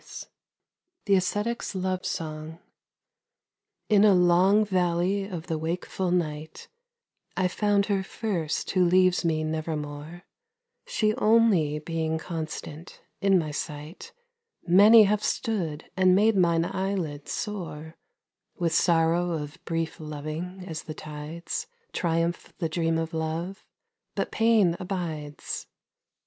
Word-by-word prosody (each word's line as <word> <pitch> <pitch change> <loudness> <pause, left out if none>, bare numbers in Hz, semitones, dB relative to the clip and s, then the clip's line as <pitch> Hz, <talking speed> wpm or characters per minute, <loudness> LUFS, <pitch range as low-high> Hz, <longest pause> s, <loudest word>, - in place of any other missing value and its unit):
137 355 0 -16
THE 200 - +4
ASCETIC'S 205 +4 -1
LOVE 185 0 -1
SONG 155 0 -5 1.3
IN 210 -2 +5
a 205 -3 +6
long 180 +4 +4
valley 185 +1 +1
of 175 -5 -6
the 160 -3 -2
wakeful 175 +3 -2
night 160 -3 -2 0.7
I 185 -1 +3
found 205 +1 +1
her 200 -2 0
first 190 -6 -2
who 185 -2 +3
leaves 185 +1 +4
me 160 -2 +1
nevermore, 155 +1 -4 0.6
She 215 - +1
only 210 - +4
being 160 0 -2
constant, 160 0 -6 0.2
in 195 -1 +4
my 155 -4 -1
sight 150 +3 -6 0.5
Many 210 +5 +8
have 210 +1 +1
stood 165 -9 -2
and 185 -1 +5
made 215 +2 +4
mine 170 -3 +3
eyelids 185 -7 -3
sore 165 -6 -5 0.6
With 170 -2 -1
sorrow 170 +1 +3
of 155 +2 -6
brief 165 -1 -2
loving, 155 +5 -6
as 160 -4 -5
the 155 - -8
tides 155 +3 -6 0.3
Triumph 165 0 -1
the 165 - -1
dream 165 0 0
of 165 0 -3
love, 165 +4 -3 0.5
but - - -2
Pain 225 -6 +3
abides. 165 -6 -5
175 Hz, 120 wpm, -27 LUFS, 160-195 Hz, 1.3 s, Many